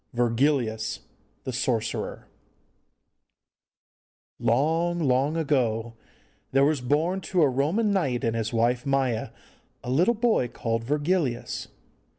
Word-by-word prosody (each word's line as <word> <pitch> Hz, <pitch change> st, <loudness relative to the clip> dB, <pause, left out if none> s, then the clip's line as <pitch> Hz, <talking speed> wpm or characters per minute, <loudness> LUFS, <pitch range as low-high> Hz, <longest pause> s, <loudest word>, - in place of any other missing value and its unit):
VIRGILIUS 120 Hz, -1 st, 0 dB, 0.4 s
THE 130 Hz, -, -4 dB
SORCERER 115 Hz, -3 st, -2 dB, 2.1 s
Long, 160 Hz, +9 st, +1 dB
long 140 Hz, 0 st, +1 dB
ago 120 Hz, -7 st, 0 dB, 0.6 s
there 135 Hz, +1 st, +4 dB
was 150 Hz, -2 st, +1 dB
born 160 Hz, +9 st, 0 dB
to 180 Hz, -2 st, +1 dB
a -, -, +5 dB
Roman 155 Hz, -, +1 dB
knight 135 Hz, -11 st, 0 dB
and 115 Hz, 0 st, 0 dB
his 110 Hz, -1 st, -2 dB
wife 120 Hz, +1 st, +1 dB
Maja 135 Hz, -5 st, 0 dB, 0.5 s
a 125 Hz, -, -4 dB
little 180 Hz, -, +3 dB
boy 220 Hz, -, +2 dB
called 115 Hz, -1 st, -3 dB
Virgilius. 145 Hz, -1 st, -1 dB
135 Hz, 110 wpm, -26 LUFS, 120-160 Hz, 2.1 s, a